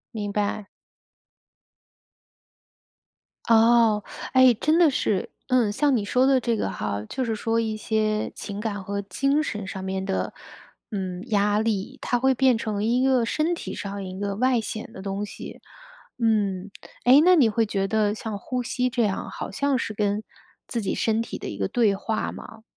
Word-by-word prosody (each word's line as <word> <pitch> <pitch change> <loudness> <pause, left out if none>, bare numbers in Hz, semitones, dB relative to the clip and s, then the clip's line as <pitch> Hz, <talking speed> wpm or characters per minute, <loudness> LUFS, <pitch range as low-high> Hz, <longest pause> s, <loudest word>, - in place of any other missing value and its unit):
明 205 -2 -3
白。 205 0 -1 2.8
哦， 225 -2 +5 0.3
哎， 260 -1 +7
真 305 +8 +2
的 340 -3 +6
是。 205 -8 -1 0.2
嗯， 250 -5 +3
像 270 +5 +2
你 220 - 0
说 250 +6 +2
的 270 -1 +4
这 235 -2 0
个 - - -1
哈， 105 -1 -3
就 260 - -3
是 225 -2 -1
说 225 +2 0
一 220 -1 -1
些 215 0 0
情 200 -1 -6
感 205 -2 -3
和 200 +1 -3
精 275 +10 +1
神 210 -9 -4
上 190 -1 -6
面 190 0 -3
的， 190 0 -2 0.6
嗯， 185 -5 -4
压 205 -2 +2
力， 215 -3 -2
它 245 - 0
会 265 +2 +3
变 260 -1 +3
成 215 -2 -2
一 240 +3 +2
个 260 -3 +3
身 310 +8 0
体 340 - -5
上 200 -1 -5
一 185 0 -7
个 200 -1 -2
外 250 +2 +2
显 220 0 -5
的 190 - -10
东 200 +1 -3
西。 210 - -8 0.6
嗯， 205 -4 0 0.3
诶， 260 +4 +7
那 365 +3 +6
你 280 -8 +5
会 225 +1 +1
觉 195 -1 -1
得 210 0 +1
像 215 -1 -5
呼 250 +4 -3
吸 250 +1 -1
这 240 -1 0
样 200 -3 -2
好 - - -6
像 280 +6 +1
是 225 - -3
跟 205 0 -1 0.4
自 235 - -2
己 200 - -2
身 225 0 +1
体 230 - -5
的 - - -7
一 100 - -6
个 95 - 0
对 220 - +2
话 215 +3 -2
吗？ 220 0 -11
220 Hz, 190 characters per minute, -25 LUFS, 200-250 Hz, 2.8 s, 哎